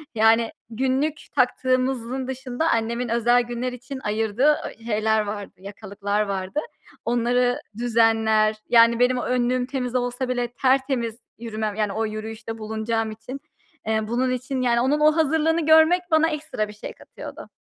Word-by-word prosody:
Yani 225 Hz, +1 st, +4 dB, 0.2 s
günlük 265 Hz, +6 st, 0 dB, 0.2 s
taktığımızın 255 Hz, 0 st, 0 dB
dışında 260 Hz, +4 st, -2 dB
annemin 235 Hz, +1 st, -1 dB
özel 240 Hz, +1 st, +3 dB
günler 240 Hz, +1 st, -4 dB
için 260 Hz, +2 st, -8 dB
ayırdığı, 220 Hz, +3 st, -1 dB, 0.2 s
ııı, -, -, -6 dB
şeyler 220 Hz, -1 st, +1 dB
vardı, 205 Hz, -1 st, -6 dB
yakalıklar 205 Hz, +1 st, -3 dB
vardı. 195 Hz, +6 st, -3 dB, 0.5 s
Onları 245 Hz, +1 st, +1 dB, 0.2 s
düzenler 225 Hz, -2 st, +3 dB
yani 230 Hz, 0 st, +5 dB
benim 250 Hz, +1 st, +3 dB
o -, -, -2 dB
önlüğüm 250 Hz, 0 st, 0 dB
temiz 255 Hz, -2 st, -4 dB
olsa 245 Hz, +1 st, -1 dB
bile 245 Hz, -1 st, 0 dB
tertemiz 260 Hz, -4 st, +1 dB, 0.2 s
yürümem 220 Hz, -2 st, -3 dB
yani 210 Hz, -2 st, -1 dB
o 225 Hz, 0 st, -1 dB
yürüyüşte 220 Hz, +1 st, -6 dB
bulunacağım 220 Hz, 0 st, -2 dB
için. 235 Hz, +5 st, -8 dB, 0.5 s
Eee, 220 Hz, -1 st, 0 dB
bunun 255 Hz, +3 st, 0 dB
için 255 Hz, +1 st, -3 dB
yani 240 Hz, -1 st, +2 dB
onun 285 Hz, +4 st, +2 dB
o 305 Hz, +1 st, +4 dB
hazırlığını 320 Hz, +1 st, +2 dB
görmek 320 Hz, +3 st, +6 dB
bana 315 Hz, +1 st, +4 dB
ekstra 300 Hz, -8 st, -3 dB
bir 210 Hz, -, -10 dB
şey 210 Hz, -, -8 dB
katıyordu. -, -, -11 dB
240 Hz, 145 wpm, -23 LUFS, 220-260 Hz, 0.5 s, görmek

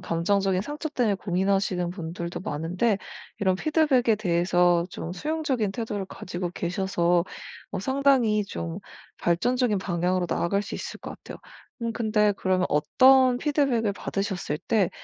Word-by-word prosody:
감정적인 190 Hz, +3 st, +1 dB
상처 295 Hz, -, -4 dB
때문에 245 Hz, -8 st, +1 dB
고민하시는 190 Hz, -1 st, 0 dB
분들도 170 Hz, -1 st, -5 dB
많은데 180 Hz, +7 st, -1 dB, 0.4 s
이런 190 Hz, -3 st, +2 dB
피드백에 270 Hz, -6 st, +2 dB
대해서 175 Hz, -2 st, +2 dB
좀 170 Hz, -, -6 dB
수용적인 270 Hz, -, -1 dB
태도를 210 Hz, -2 st, -3 dB
가지고 175 Hz, -1 st, -5 dB
계셔서 175 Hz, -1 st, 0 dB, 0.5 s
어 -, -, -3 dB
상당히 265 Hz, -4 st, +2 dB
좀 170 Hz, -2 st, -5 dB, 0.4 s
발전적인 225 Hz, +5 st, +1 dB
방향으로 180 Hz, 0 st, 0 dB
나아갈 200 Hz, +5 st, 0 dB
수 215 Hz, -, -7 dB
있을 -, -, -6 dB
것 -, -, -7 dB
같아요. -, -, -10 dB, 0.4 s
음 230 Hz, 0 st, -1 dB
근데 215 Hz, -2 st, +2 dB
그러면 185 Hz, -1 st, +1 dB
어떤 255 Hz, -, +5 dB
피드백을 270 Hz, -7 st, +1 dB
받으셨을 195 Hz, -6 st, -3 dB
때 210 Hz, -6 st, +1 dB
195 Hz, 330 characters per minute, -26 LUFS, 175-235 Hz, 0.5 s, 어떤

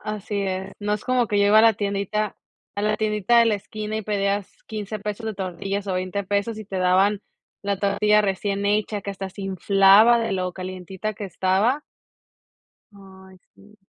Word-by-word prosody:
Así 210 Hz, -1 st, -4 dB
es, 190 Hz, 0 st, -3 dB
no 210 Hz, 0 st, -1 dB
es 210 Hz, -, -4 dB
como 255 Hz, -2 st, +1 dB
que 205 Hz, -1 st, +1 dB
yo 200 Hz, -, +4 dB
iba 215 Hz, +1 st, +6 dB
a -, -, +7 dB
la 225 Hz, 0 st, +6 dB
tiendita 200 Hz, +1 st, -2 dB, 0.4 s
a 205 Hz, -, 0 dB
la 215 Hz, 0 st, +1 dB
tiendita 215 Hz, +2 st, +2 dB
de 230 Hz, -, +5 dB
la 220 Hz, -, +3 dB
esquina, 215 Hz, +1 st, -6 dB
y 220 Hz, -, -2 dB
pedías 200 Hz, -1 st, -1 dB, 0.2 s
$15 215 Hz, 0 st, -5 dB
pesos 210 Hz, +2 st, -5 dB
de 220 Hz, -, -2 dB
tortillas 195 Hz, +1 st, -4 dB
o 190 Hz, -, -1 dB
$20 185 Hz, +2 st, -3 dB
pesos 205 Hz, +3 st, -1 dB
y 215 Hz, -, -8 dB
te 195 Hz, -2 st, -5 dB
daban 190 Hz, +3 st, +3 dB, 0.4 s
la 200 Hz, -1 st, -1 dB
tortilla 210 Hz, +1 st, +3 dB
recién 200 Hz, 0 st, -1 dB
hecha, 210 Hz, 0 st, 0 dB
que 200 Hz, -, -5 dB
hasta 195 Hz, 0 st, -6 dB
se 195 Hz, +1 st, -9 dB
inflaba 195 Hz, +4 st, +5 dB
de 225 Hz, -3 st, -1 dB
lo 185 Hz, -1 st, -2 dB
calientita 185 Hz, +3 st, -6 dB
que 210 Hz, -, -8 dB
estaba. 195 Hz, +9 st, +1 dB, 1.1 s
Ay, 190 Hz, -1 st, -15 dB, 0.2 s
sí. 205 Hz, 0 st, -21 dB
200 Hz, 190 wpm, -23 LUFS, 195-215 Hz, 1.1 s, a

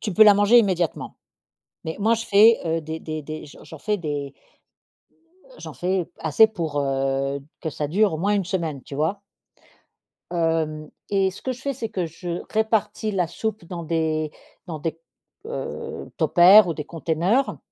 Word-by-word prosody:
tu 210 Hz, -, -3 dB
peux 215 Hz, +4 st, +7 dB
la 210 Hz, -1 st, +8 dB
manger 205 Hz, +4 st, +6 dB
immédiatement. 185 Hz, -7 st, 0 dB, 0.7 s
Mais 160 Hz, -, -4 dB
moi, 220 Hz, +3 st, +3 dB
je 230 Hz, +1 st, -5 dB
fais, 215 Hz, +3 st, +6 dB
heu, 165 Hz, 0 st, 0 dB
des 160 Hz, +1 st, -6 dB
des 155 Hz, -1 st, -5 dB
des 155 Hz, +1 st, -7 dB
j'en 145 Hz, -, -14 dB
j'en 160 Hz, -, -11 dB
fais 210 Hz, +5 st, -1 dB
des 145 Hz, -5 st, -4 dB, 1.1 s
heu, -, -, -22 dB
j'en -, -, -8 dB
fais 180 Hz, -1 st, -1 dB
assez 160 Hz, +8 st, +5 dB
pour, 165 Hz, -9 st, -3 dB
heu, 135 Hz, 0 st, -1 dB, 0.2 s
que 160 Hz, -, -2 dB
ça 150 Hz, 0 st, -3 dB
dure 195 Hz, +4 st, +2 dB
au -, -, -2 dB
moins 200 Hz, +6 st, +1 dB
1 195 Hz, -3 st, 0 dB
semaine, 165 Hz, -7 st, -3 dB
tu 140 Hz, -, -9 dB
vois? 160 Hz, +8 st, -1 dB, 1.1 s
hem, 160 Hz, -3 st, -1 dB, 0.2 s
et 195 Hz, -1 st, +2 dB
ce 185 Hz, -, -12 dB
que 260 Hz, -, -2 dB
je 255 Hz, -, -11 dB
fais, 280 Hz, -, -1 dB
c'est 235 Hz, -4 st, -5 dB
que 185 Hz, -5 st, -2 dB
je 170 Hz, +2 st, -6 dB
répartis 220 Hz, 0 st, 0 dB
la 180 Hz, -3 st, +1 dB
soupe 215 Hz, +1 st, -4 dB
dans 170 Hz, 0 st, -7 dB
des 155 Hz, -1 st, -1 dB, 0.3 s
dans 165 Hz, -3 st, -5 dB
des, 160 Hz, +2 st, -3 dB, 0.5 s
heu, 470 Hz, -, -6 dB
tupper 190 Hz, +4 st, +7 dB
ou 170 Hz, -, -2 dB
des 150 Hz, -, -5 dB
conteneurs 170 Hz, -, 0 dB
170 Hz, 180 wpm, -23 LUFS, 155-205 Hz, 1.1 s, la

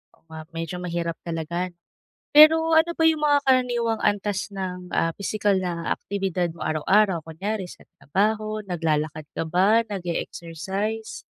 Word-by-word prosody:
Oo -, -, -34 dB
nga, 160 Hz, 0 st, -8 dB, 0.2 s
medyo 165 Hz, +1 st, -4 dB
mahirap 170 Hz, -1 st, -2 dB
talaga. 170 Hz, +2 st, -3 dB, 0.6 s
Pero 320 Hz, +2 st, +7 dB
ano 320 Hz, +2 st, +4 dB
ba 325 Hz, -, -1 dB
yung 310 Hz, -1 st, -1 dB
mga 290 Hz, -1 st, +4 dB
karaniwang 245 Hz, -4 st, +1 dB
antas 205 Hz, 0 st, -1 dB
ng, 180 Hz, -2 st, -5 dB
ah, 165 Hz, -, +2 dB
pisikal 205 Hz, 0 st, 0 dB
na 175 Hz, -3 st, -3 dB
aktibidad 190 Hz, -3 st, -2 dB
mo 170 Hz, -, -14 dB
araw-araw? 175 Hz, +2 st, +2 dB
Kunyari 190 Hz, +5 st, -4 dB
sa -, -, -13 dB, 0.2 s
trabaho, 215 Hz, +6 st, -1 dB
naglalakad 155 Hz, -5 st, -2 dB
ka -, -, -2 dB
ba, 200 Hz, +7 st, +4 dB
nag-e-exercise? 190 Hz, +3 st, -4 dB
190 Hz, 135 wpm, -24 LUFS, 170-215 Hz, 0.6 s, Pero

